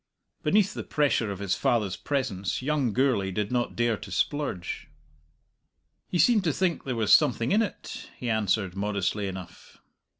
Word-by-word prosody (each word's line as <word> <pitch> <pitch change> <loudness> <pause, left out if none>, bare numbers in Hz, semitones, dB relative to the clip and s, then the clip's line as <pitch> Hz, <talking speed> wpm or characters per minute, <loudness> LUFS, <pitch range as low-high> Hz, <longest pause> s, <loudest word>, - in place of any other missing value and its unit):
Beneath 205 -2 +3
the - - -4
pressure 140 -7 +1
of 100 - -4
his 100 -1 -1
father's 105 -6 +1
presence 125 -7 -2
young 145 -4 +1
Gourlay 120 -5 +2
did 105 +3 -2
not 120 -1 -1
dare 120 -2 +1
to 100 - -10
splurge. 120 -7 -2 1.2
"He 180 - -1
seemed 215 +2 +4
to 160 - +3
think 180 0 0
there 130 -2 -2
was 110 -2 +3
something 125 -5 +4
in 215 - +4
it," 215 - -5
he 125 - -5
answered, 105 -4 0
modestly 100 0 -1
enough. 95 -2 -9
115 Hz, 160 wpm, -27 LUFS, 100-145 Hz, 1.2 s, seemed